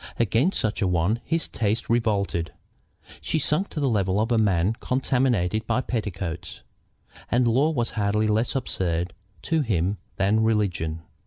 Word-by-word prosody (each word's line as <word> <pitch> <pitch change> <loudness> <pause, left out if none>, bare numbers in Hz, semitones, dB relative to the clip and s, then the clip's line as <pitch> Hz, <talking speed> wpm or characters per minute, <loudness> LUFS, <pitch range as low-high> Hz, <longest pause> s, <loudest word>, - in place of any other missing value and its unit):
Against 120 - +2
such 110 0 -1
a 100 - +2
one 90 +6 +1
his 165 +2 -1
taste 110 0 -1
revolted. 105 -7 0 0.7
She - - -1
sunk 155 +6 +1
to - - -5
the 140 - +1
level 100 -4 +1
of 110 +3 0
a 115 - +3
man 100 -1 +2
contaminated 125 -6 0
by 115 +2 +1
petticoats. 90 -8 -4 0.7
And 120 0 +3
law 130 +7 +3
was 120 -7 -1
hardly 105 0 +1
less 110 +4 +1
absurd 90 -9 -1 0.3
to 160 -1 +1
him 100 - 0 0.2
than 100 +3 +2
religion. 90 -8 0
110 Hz, 150 wpm, -25 LUFS, 95-120 Hz, 0.7 s, a